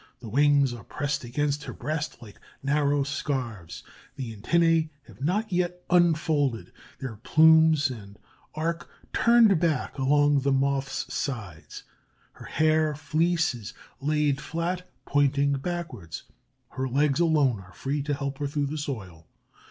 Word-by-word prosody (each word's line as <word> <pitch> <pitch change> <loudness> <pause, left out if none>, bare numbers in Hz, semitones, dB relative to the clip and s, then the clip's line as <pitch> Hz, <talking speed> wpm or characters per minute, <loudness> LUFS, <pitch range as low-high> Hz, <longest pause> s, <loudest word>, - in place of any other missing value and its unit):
The 115 - -9
wings 140 +1 +3
are 115 -3 -9
pressed 140 +3 -3
against 145 +4 -2
her - - -6
breast 155 +1 -4
like 105 -3 -14 0.2
narrow 145 0 +2
scarfs; 130 - -4 0.3
the 125 -5 -6
antennæ 165 +7 +2 0.2
have - - -16
not 205 +9 0
yet 180 0 -1
unfolded 155 -8 +2 0.3
their 125 -6 -6
plumes 160 +2 +5
and 100 -4 -10 0.4
are 165 +2 -1 0.3
turned 230 -6 +5
back 155 -5 -1
along 145 +1 +3
the 140 +1 0
Moth's 135 0 -1
sides. 95 - -5 0.5
Her - - -13
hair 155 0 +2
fleece 160 +2 +1
is 120 +1 -9 0.2
laid 145 -1 +1
flat, 175 +2 -3 0.2
pointing 140 0 +2
backwards. 140 - -5 0.5
Her 130 0 -3
legs 140 +2 +2
alone 150 -9 +3
are 95 -1 -14
free, 140 +9 -2
to 145 0 -1
help 140 -1 -4
her 145 - -1
through 145 0 -1
the 155 - -3
soil. 95 - -6
145 Hz, 135 wpm, -26 LUFS, 130-160 Hz, 0.5 s, plumes